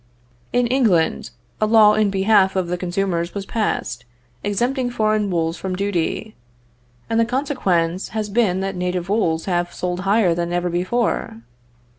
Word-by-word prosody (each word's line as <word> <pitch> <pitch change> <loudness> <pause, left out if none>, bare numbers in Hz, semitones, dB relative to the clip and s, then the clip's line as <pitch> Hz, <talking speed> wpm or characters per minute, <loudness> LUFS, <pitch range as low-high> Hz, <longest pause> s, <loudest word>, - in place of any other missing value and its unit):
In 245 0 +2
England 230 -10 +1 0.3
a 215 - +3
law 215 -1 +6
in 215 -1 +2
behalf 195 0 +3
of 185 -2 -1
the 180 - -1
consumers 175 -1 -2
was 200 -1 -4
passed, 125 - -2 0.4
exempting 245 +5 0
foreign 215 -3 0
wools 165 -1 -1
from 190 -1 -4
duty, 200 +2 -2 0.7
and 225 - 0
the - - +5
consequence 205 - 0
has 215 -1 -3
been 200 -3 +1
that 195 0 -3
native 180 0 -2
wools 170 -7 0
have 175 -2 -1
sold 180 0 -3
higher 195 -1 +2
than 170 0 -2
ever 175 0 -1
before. 180 - -1
195 Hz, 150 wpm, -21 LUFS, 175-215 Hz, 0.7 s, law